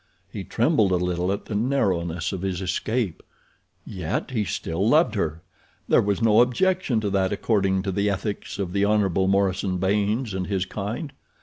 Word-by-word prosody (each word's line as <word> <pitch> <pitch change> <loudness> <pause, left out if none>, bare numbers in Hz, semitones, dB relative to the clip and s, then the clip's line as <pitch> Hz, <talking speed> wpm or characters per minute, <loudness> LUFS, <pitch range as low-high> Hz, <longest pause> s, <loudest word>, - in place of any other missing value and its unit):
He - - -5
trembled 100 -3 +2
a - - +3
little 90 +1 0
at 100 - -3
the - - -6
narrowness 90 -8 0
of 95 - -4
his 95 -2 -2
escape. 95 +1 -2 0.6
Yet, 90 +5 -3
he 110 -5 0
still 85 +4 -1
loved 155 +5 +4
her. 85 -6 -2 0.4
There - - +5
was 100 +2 -1
no 110 0 +6
objection 145 0 +1
to 105 -2 -1
that 95 -1 +1
according 95 -2 +1
to 100 - -2
the 100 +2 +1
ethics 100 +1 -3
of 95 -3 -3
the 100 0 +1
Hon. 100 -3 +2 0.2
Morison 95 -1 +1
Baynes 105 +5 0
and 95 -1 -3
his 95 -2 -1
kind. 110 - -5
100 Hz, 175 wpm, -24 LUFS, 95-110 Hz, 0.6 s, no